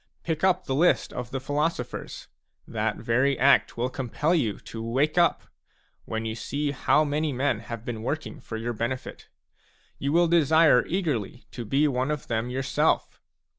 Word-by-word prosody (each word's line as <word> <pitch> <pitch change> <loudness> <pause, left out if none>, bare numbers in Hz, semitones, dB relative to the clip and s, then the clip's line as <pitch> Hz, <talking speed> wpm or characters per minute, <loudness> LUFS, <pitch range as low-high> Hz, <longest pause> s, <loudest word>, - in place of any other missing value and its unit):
Pick 160 0 -2
up 185 -1 +3
the 135 - -2
list 165 +6 +2
of 125 -1 -5
the 135 - -3
philosophers; 145 0 -3 0.4
that - - -1
very 130 +3 +1
act 135 -1 +4
will 120 +2 0
compel 135 +6 -1
you 120 - +1
to 115 - -8
wake 130 +7 0
up, 175 -1 +3 0.6
when 110 0 -3
you 110 - -2
see 145 +6 -2
how 145 +3 +3
many 150 +1 -1
men 130 -3 0
have 115 0 -8
been 115 -3 -4
working 150 +7 -4
for 110 - -6
your 120 +2 -3
benefit. 120 +3 -5 0.7
You 140 - -1
will 170 +2 +4
desire 160 -5 +5
eagerly 145 - -2
to 120 - -6
be 140 +7 +2
one 130 0 0
of 150 -2 -3
them 115 +1 -2
yourself. 130 +1 0
135 Hz, 170 wpm, -26 LUFS, 120-150 Hz, 0.7 s, desire